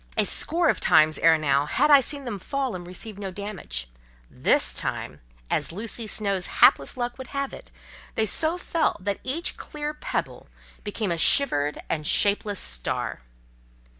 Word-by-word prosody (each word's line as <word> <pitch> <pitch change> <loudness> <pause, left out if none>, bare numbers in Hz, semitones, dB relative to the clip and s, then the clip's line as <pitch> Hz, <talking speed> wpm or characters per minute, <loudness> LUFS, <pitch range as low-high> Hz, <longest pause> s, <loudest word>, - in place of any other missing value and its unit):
A - - +4
score 340 0 +1
of - - +2
times 155 0 +4
ere 165 -1 +5
now 140 -2 +1
had 300 - +2
I 285 -1 +8
seen 280 +1 +1
them 210 -5 -5
fall 270 +5 -3
and 175 -1 -7
receive 200 +3 -7
no 195 -2 -4
damage—this - - -2
time, - - -4 0.3
as - - -1
Lucy 220 +4 -4
Snowe's 200 -3 0
hapless 140 - +4
luck 245 +1 -4
would 260 - -7
have 275 -1 -4
it, - - -11 0.5
they 220 - +2
so 320 - +1
fell 335 -2 -1
that 200 +1 -3
each 310 +7 -2
clear 300 0 -5
pebble 300 - -4 0.4
became 205 -2 -3
a 170 - -2
shivered 150 - +3
and 150 -2 -2
shapeless 205 0 +2
star. 60 -1 -2
205 Hz, 160 wpm, -25 LUFS, -, 0.5 s, I